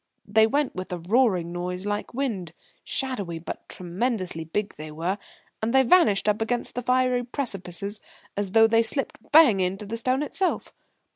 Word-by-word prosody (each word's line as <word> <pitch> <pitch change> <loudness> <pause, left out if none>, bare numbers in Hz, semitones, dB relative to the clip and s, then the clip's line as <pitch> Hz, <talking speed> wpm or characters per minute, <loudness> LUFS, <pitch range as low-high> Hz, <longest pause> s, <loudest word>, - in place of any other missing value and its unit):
They 220 +2 +4
went 285 +4 0
with 185 0 -6
a 180 - -2
roaring 185 -2 +2
noise 180 +2 -4
like 205 0 -2
wind; 220 -11 -3 0.3
shadowy 205 -11 -3
but 165 - -8
tremendously 185 -2 -2
big, 200 +6 -3
they 155 0 -8
were, 170 +6 -2 0.4
and 230 +4 0
they 265 - +7
vanished 235 - +4
up 210 +1 +2
against 240 +2 -1
the 250 - -3
fiery 250 0 +2
precipices 205 - -3 0.3
as 200 -2 -3
though 225 0 +7
they 225 +1 +4
slipped 270 +5 -1
bang 295 -10 +7
into 190 +3 -1
the 225 +3 -4
stone 255 +4 0
itself. 370 +5 -2
210 Hz, 165 wpm, -25 LUFS, 180-250 Hz, 0.4 s, they